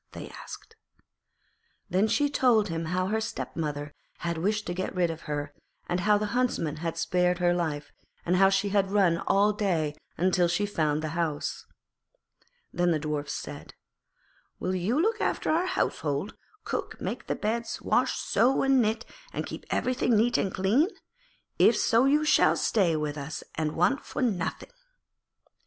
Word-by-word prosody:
they - - -8
asked. 450 - -11 1.1
Then 190 +4 +2
she 230 +7 +2
told 245 -6 +3
them 165 -3 -3
how 180 +3 0
her 220 +1 0
stepmother 150 -8 -4 0.2
had 170 0 -2
wished 210 +4 0
to 175 - -3
get 185 +2 -4
rid 175 -2 +2
of 160 - -8
her, 145 0 -3 0.3
how 190 +4 +2
the 210 - -1
Huntsman 240 - 0
had 165 +1 -3
spared 180 0 +1
her 175 -1 +2
life, 150 -4 -2 0.3
and 180 +2 +2
how 195 +1 +6
she 195 +1 +1
had 195 -1 +2
run 190 -5 +3
all 205 +2 +4
day 175 -8 0 0.4
till 175 -1 +3
she 180 +4 0
had 205 - -9
found 155 -1 +1
the 155 - -2
house. 160 -2 -3 1.1
Then 175 0 +2
the 165 - +2
Dwarfs 150 -1 -3
said, - - -8 0.8
'Will 185 - -1
you 190 - 0
look 440 +7 +1
after - - 0
our 340 +4 +2
household, 160 - -1 0.3
cook, - - -4
make - - -5
the - - -1
beds, 230 +2 -2
wash, - - +1
sew 255 +4 +2
and 270 -1 +4
knit, 220 +1 0 0.3
and - - -3
keep - - -8
everything 245 -2 +1
neat 235 +3 +2
and 195 - +1
clean? 210 - +2 0.7
If - - +6
so 235 +2 +3
you 295 +3 +3
shall - - +5
stay 185 -7 +2
with 150 -1 -2
us 150 +3 -6
and 155 -1 -2
want 185 - +2
for - - -3
nothing.' 195 - -2
185 Hz, 165 wpm, -28 LUFS, 165-220 Hz, 1.1 s, how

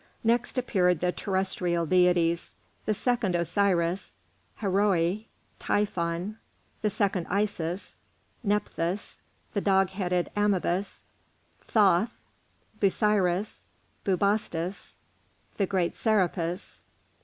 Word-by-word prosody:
Next 235 +2 +1
appeared 180 -9 +2
the 180 +1 +1
terrestrial 185 -3 0
deities: 175 -1 +2 0.3
the 215 - +2
second 230 -5 0
Osiris, 175 0 +1 0.4
Haroeri, 195 0 +1 0.3
Typhon, 185 0 -1 0.4
the 215 - +2
second 195 -4 0
Isis, 190 -3 -2 0.5
Nephthys, 205 -3 -2 0.3
the 200 - 0
dog 195 -1 +3
headed 180 -2 -1
Anubis, 200 -2 0 0.6
Thoth, 205 -1 +4 0.7
Busiris, 200 -1 +1 0.4
Bubastis, 195 -2 -1 0.6
the 195 - +1
great 185 -3 0
Serapis. 180 -4 0
190 Hz, 85 wpm, -28 LUFS, 175-205 Hz, 0.7 s, Thoth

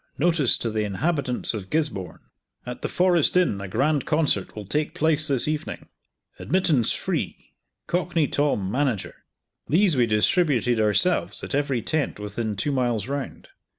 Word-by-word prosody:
Notice 160 -4 +3
to 115 - -3
the 110 0 -1
inhabitants 125 - 0
of 100 -4 -6
Gisborne! 150 - -2 0.4
At 125 0 -7
the - - -2
Forest 180 -2 +2
Inn 155 - +1
a 100 - -5
grand 135 +8 0
concert 150 - 0
will 105 -1 -7
take 150 +9 -2
place 155 0 +2
this 135 -3 +2
evening! 155 -1 -4 0.5
Admittance 160 - +2
free. - - -3 0.3
Cockney 175 -3 0
Tom, 130 -11 0
manager.'" 115 -9 -2 0.4
These 175 +1 +3
we 120 -2 +3
distributed 120 - +2
ourselves 140 - +1
at - - -6
every 140 -4 0
tent 155 -8 -2
within 105 +1 -4
two 110 +9 -1
miles 120 -5 0
round. 140 0 -5
140 Hz, 150 wpm, -24 LUFS, 110-155 Hz, 0.5 s, Notice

